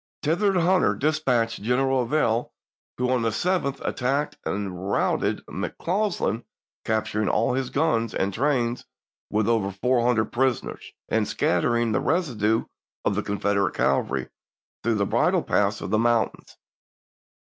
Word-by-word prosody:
Thither 185 +5 +2
Hunter 180 +2 +3
dispatched 130 -8 0
General 130 +4 +2
Averill, 120 -3 0 0.4
who 125 0 0
on 125 -2 +2
the 115 - +1
7th 140 +2 0
attacked 135 +4 -1
and 95 -2 -3
routed - - 0
Mc - - -5
Causland, 180 - -1 0.4
capturing 110 -1 0
all - - +2
his 130 -1 -1
gnns 135 -7 0
and 95 +1 0
trains 120 -1 0 0.5
with 105 0 +1
over 110 -4 +2
four 120 +5 +1
hundred 115 -3 +1
prisoners, 130 -1 -1 0.2
and 110 -2 +1
scattering 115 +3 +1
the 110 - +2
residue 120 - +1 0.4
of - - +2
the - - 0
Confederate 100 -1 0
cavalry 65 -1 0 0.5
through 115 -1 +1
the 100 -1 +1
bridle - - +2
paths - - +1
of - - -5
the 110 - +3
mountains. 120 -1 0
120 Hz, 140 wpm, -25 LUFS, 110-140 Hz, 0.5 s, Hunter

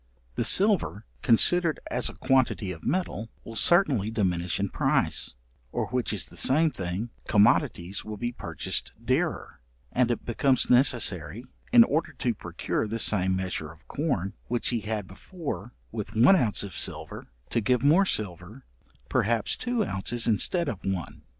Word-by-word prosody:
The - - -1
silver 190 - +2 0.2
considered 165 +8 +3
as 125 - +3
a - - -11
quantity 130 -7 +1
of 80 -3 -9
metal, 115 - -2
will 115 - -9
certainly 140 - +3
diminish 90 -6 -1
in 100 0 -1
price, - - 0 0.4
or - - -2
which 125 -1 -1
is 100 -6 +1
the - - -14
same 155 +4 +4
thing, 95 +4 -4 0.2
commodities 105 - +2
will 110 -1 -7
be 120 +3 -3
purchased - - -2
dearer, - - -1 0.3
and 125 -1 +2
it 120 - -2
becomes 130 +2 +1
necessary, 115 - +2 0.3
in 240 -2 +8
order 160 -5 -1
to 125 -3 -1
procure 110 - -3
the 115 +2 -3
same 95 -4 +3
measure 90 -4 -4
of 80 0 -20
corn 120 - -2
which 120 0 0
he 120 - 0
had 105 -1 -4
before 125 - -7 0.2
with 110 0 -6
one 125 - +6
ounce 120 - +1
of 100 -3 -8
silver, - - -3 0.2
to 115 - +1
give 125 +3 +1
more 170 +7 +4
silver, 95 - -3 0.4
perhaps 115 0 +1
two 240 -3 -1
ounces 115 +5 -2
instead 165 - +2
of 100 -4 -5
one. 95 -4 -4
115 Hz, 155 wpm, -26 LUFS, 100-135 Hz, 0.4 s, in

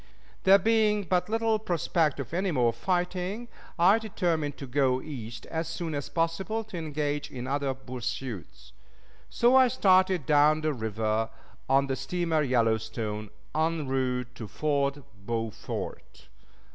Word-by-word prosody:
There 195 +1 +8
being 210 0 +2
but 180 +2 0
little 225 0 +1
prospect 170 -6 0
of 140 - -6
any 190 +3 0
more 125 -7 +2
fighting, 180 - -2 0.3
I 190 +6 +5
determined 170 -9 -1
to 140 - -6
go 130 0 +2
East 120 -6 -7
as 160 -1 -3
soon 165 0 -4
as 145 -1 -3
possible 175 +7 -1
to 215 -4 -8
engage 150 -2 -2
in 125 -1 -6
other 135 0 -1
pursuits. 120 - -6 0.6
So 240 +2 +3
I 260 -1 +7
started 185 - +3
down 150 +2 +4
the 155 -1 0
river 110 -1 -1 0.4
on 135 +1 +4
the 135 -1 -1
steamer 160 +4 0
Yellowstone, 110 -4 0 0.2
en 160 -1 0
route 125 -2 -1
to 110 - -7
Fort 140 +3 -1 0.2
Beaufort. 115 0 -5
150 Hz, 135 wpm, -28 LUFS, 125-180 Hz, 0.6 s, There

